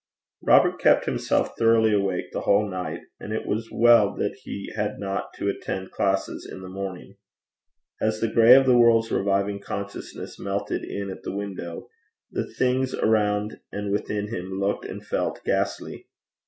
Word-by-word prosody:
Robert - - +4
kept - - +4
himself - - 0
thoroughly 115 -1 +4
awake 100 -3 0
the - - -3
whole 105 +1 +3
night, 90 -2 -4 0.2
and 105 - -7
it 110 - -2
was 115 +2 -2
well 115 -4 +5
that 100 - -1
he 100 - -6
had 105 -1 -2
not 100 -1 -3
to - - -3
attend 95 -1 -3
classes 95 -1 -1
in 95 - -8
the 95 - -8
morning. 95 -1 -7 0.8
As 110 0 0
the 115 - +1
gray 115 +2 +7
of 135 0 +6
the 130 -1 +5
world's 115 -1 +5
reviving 100 0 0
consciousness 100 0 -7
melted 100 0 -2
in 100 -1 -4
at - - -9
the - - -5
window, 95 -4 -6 0.4
the - - -3
things 130 +1 0
around 105 -1 +1
and 100 0 -3
within 105 0 -2
him 95 -3 -5
looked 100 +1 -1
and - - -7
felt - - -2
ghastly. - - -2
100 Hz, 165 wpm, -25 LUFS, 100-110 Hz, 0.8 s, gray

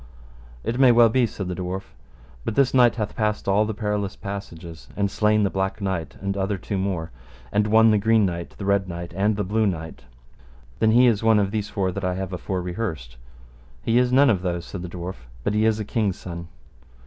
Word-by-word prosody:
It 120 - -2
may 130 -2 +7
well 120 -1 +6
be, 120 +1 +2
said 95 -3 -6
the 90 - -3
dwarf, 95 +2 -5 0.5
but 105 - -3
this 135 -2 +3
knight 125 -2 +5
hath 105 -3 -3
passed 105 -2 -1
all 100 +2 +3
the 110 - -3
perilous 105 -2 -2
passages, 85 -5 -8
and 100 -1 0
slain 105 0 +2
the 100 - +1
Black 95 +1 -2
Knight 95 -5 -3
and 100 0 -2
other 95 0 -1
two 95 +2 -3
more, 90 -4 -2 0.4
and 105 0 +2
won 110 +1 +6
the 105 - +3
Green 110 0 +3
Knight, 85 -2 -4
the 100 - -5
Red 100 -1 +1
Knight, 85 0 -6
and 100 +3 +2
the 105 - -1
Blue 105 +3 +1
Knight. 80 -4 -5 0.7
Then 110 - +4
is 120 -3 +5
he - - -4
one 110 -1 +6
of 100 -1 +1
these 105 -1 -2
four 95 -3 -1
that 100 +2 -5
I 90 -1 0
have 95 0 -4
afore 90 0 -3
rehearsed. 85 - -5 0.7
He 115 +2 +3
is 125 0 +2
none 135 0 +6
of 95 -5 0
those, 85 -2 -2
said 95 - -7
the 90 - -6
dwarf, 90 +1 -6 0.3
but 105 - 0
he 105 +1 +2
is 110 -1 +2
a 105 - -3
king's 105 -3 -1
son. 85 -1 -7
100 Hz, 220 wpm, -24 LUFS, 90-110 Hz, 0.7 s, may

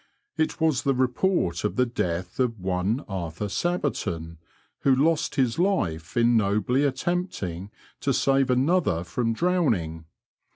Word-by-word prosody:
It 160 +1 -1
was 160 -6 +2
the 135 -1 +1
report 125 - +1
of 105 - -1
the 125 - +3
death 90 -6 -3
of 120 -4 0
one 95 +6 -1
Arthur 90 -1 -4
Sabberton, 95 - -2 0.4
who 135 -1 +3
lost 155 +3 +1
his 130 -2 +1
life 90 - 0
in 120 0 +4
nobly 110 +5 +2
attempting 135 - -2 0.3
to - - 0
save 135 -1 +2
another 130 - +2
from 115 +6 -1
drowning. 110 - 0
120 Hz, 130 wpm, -25 LUFS, 90-145 Hz, 0.4 s, in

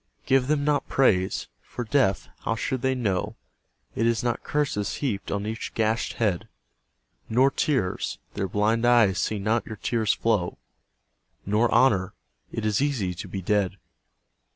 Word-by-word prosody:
Give 130 -1 +3
them 145 -1 +1
not 145 -1 +1
praise. 95 - +2
For, 120 - -6
deaf, 115 -5 +1
how 115 - -1
should 125 +2 -2
they 130 +1 +1
know 100 -7 -1 0.6
It 115 - +1
is 115 0 +1
not 120 -1 -1
curses 135 -9 -1
heaped 115 -9 -3
on 100 0 -2
each 110 +1 -5
gashed 110 +1 0
head? 100 -7 -1 0.8
Nor 130 +4 +4
tears. 130 -9 -1 0.2
Their 95 - -2
blind 105 +4 +1
eyes 115 -6 +4
see 105 - 0
not 110 +4 0
your 110 - -6
tears 110 -1 0
flow. 105 -6 0 0.9
Nor 105 +4 +2
honour. 100 -8 +3 0.4
It 115 - -3
is 105 +1 +1
easy 125 -11 0
to 85 - -7
be 95 -2 -5
dead. 100 0 +1
110 Hz, 150 wpm, -26 LUFS, 100-125 Hz, 0.9 s, Nor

